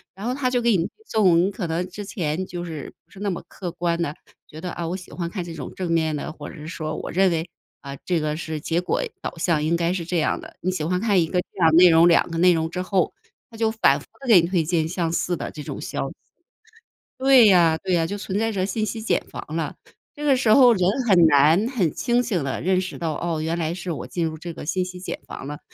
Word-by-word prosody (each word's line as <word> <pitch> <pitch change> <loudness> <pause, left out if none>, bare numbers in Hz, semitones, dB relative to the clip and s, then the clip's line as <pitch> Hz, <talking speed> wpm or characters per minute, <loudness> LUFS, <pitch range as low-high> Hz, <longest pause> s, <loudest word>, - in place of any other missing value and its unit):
然 195 +3 -8
后 245 - 0
它 260 -1 0
就 250 -1 +1
给 235 -4 +3
你 165 - 0 0.2
这 220 - -2
种 185 -1 +4
可 195 -4 -4
能 165 +2 -1
之 205 +3 -7
前 180 -4 -2
就 175 -1 -6
是 160 -5 -7
不 - - -36
是 195 - -13
那 205 0 -1
么 180 - -4
客 180 -3 -6
观 170 -1 -1
的， 150 -3 -2 0.3
觉 155 - -11
得 180 - -4
啊 170 - -4
我 175 - -2
喜 185 -1 -10
欢 170 -2 -4
看 185 -1 -4
这 170 -1 -8
种 150 -5 -7
正 180 -3 -3
面 160 -2 +1
的 145 - -4
或 150 -1 -9
者 - - -11
是 150 -2 -10
说 155 -2 -4
我 - - -5
认 190 +2 +3
为 165 0 -2 0.3
啊 140 -1 -8
这 175 -3 0
个 150 0 -2
是 160 -2 -5
结 165 +3 0
果 180 - -1 0.2
导 - - -5
向 165 -2 +1
应 155 +3 +1
该 170 0 0
是 180 -2 -3
这 175 0 0
样 155 - 0
的。 - - -12
你 185 - 0
喜 185 - -3
欢 180 +2 0
看 205 -5 +3
一 165 - 0
个 180 +2 0
这 190 - -16
样 165 -2 +6
的 - - +3
内 180 +1 +8
容， 165 +1 +6
两 170 - +4
个 165 - -3
内 180 +1 +5
容 160 -1 -1
之 180 +2 -4
后， 185 -1 0 0.4
它 225 - -13
就 225 0 +2
反 140 -11 +3
复 - - -14 0.2
地 270 - -8
给 210 -6 +8
你 170 - -1
推 175 -2 +1
荐 160 0 0
相 165 -1 -2
似 175 +1 0
的 - - -5
这 150 - -8
种 - - -6
消 - - -3
息。 - - -12 1.0
对 265 -2 +6
呀 170 -5 +5
对 190 -1 0
呀， 165 -2 +2
就 205 - -4
存 195 -1 -3
在 225 +1 0
着 190 -3 -1
信 215 +3 -1
息 220 +1 -4
茧 220 - 0
房 - - -7
了。 - - -2 0.4
这 295 - -7
个 280 -2 +5
时 240 -4 +3
候 250 -2 +7
人 185 -3 +2 0.2
很 180 -5 +6
难 160 +8 +4
很 215 -11 +1
清 240 0 +1
醒 200 - -1
地 135 - -3
认 185 +1 +2
识 185 - -6
到， 165 -2 -2
哦， 165 -2 -2
原 165 +2 -1
来 165 -1 -1
是 180 +1 -6
我 155 - -5
进 170 -2 -2
入 160 -1 -4
这 170 +2 -7
个 - - -8
信 185 +4 0
息 180 0 -7
茧 185 - -5
房 135 - -8
了， 145 0 -6
175 Hz, 300 characters per minute, -23 LUFS, 160-195 Hz, 1.0 s, 内